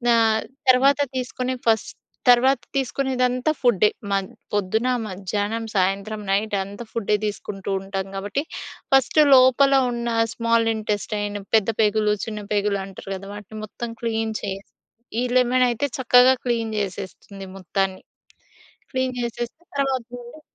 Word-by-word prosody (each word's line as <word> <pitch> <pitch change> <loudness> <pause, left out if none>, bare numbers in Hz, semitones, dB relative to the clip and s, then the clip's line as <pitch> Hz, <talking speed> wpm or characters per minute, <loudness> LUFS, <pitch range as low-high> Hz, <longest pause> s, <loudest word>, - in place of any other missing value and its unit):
ఆహ్, 220 -1 +3 0.3
తర్వాత 275 +3 +5 0.2
తీసుకునే 255 0 -2
ఫస్ట్ 220 -1 +2 0.4
తర్వాత 250 +1 +5
తీసుకునేదంతా 255 0 0
ఫుడ్డే. 215 -4 +4 0.2
మన్ 195 -1 0 0.2
పొద్దున, 205 +4 0 0.2
మధ్యాహ్నం, 205 +4 -3
సాయంత్రం, 200 +3 0
నైట్ 205 +1 +1
అంతా 200 +4 -8
ఫుడ్డే 210 -2 0
తీసుకుంటూ 200 -1 -5
ఉంటాం 195 0 -4
కాబట్టి 205 +8 -2 0.5
ఫస్ట్ 270 +3 +4
లోపల 260 +2 +6 0.2
ఉన్న 235 0 -3 0.3
స్మాల్ 230 -1 +2
ఇంటెస్టైన్, 205 -1 -2 0.2
పెద్ద 220 0 +3
పేగులు, 210 0 +3
చిన్న 215 -2 -5
పేగులు 205 -1 +1
అంటారు 195 0 -10
గదా! 195 +1 -9
వాటిని 210 +1 -10
మొత్తం 235 +2 -6
క్లీన్ 225 -1 -1
చేసి, 195 +1 -5 0.5
ఈ - - +1
లెమన్ 250 0 +4
అయితే 240 +4 -1
చక్కగా 255 0 +6
క్లీన్ 230 -2 0
చేసేస్తుంది 195 0 -6
మొత్తాన్ని. 190 +1 -2 0.9
క్లీన్ 260 -1 -1
చేసేస్తే 240 +6 -5 0.2
తర్వాత 265 -3 0
నుండి 245 +6 -11
220 Hz, 125 wpm, -23 LUFS, 200-250 Hz, 0.9 s, లోపల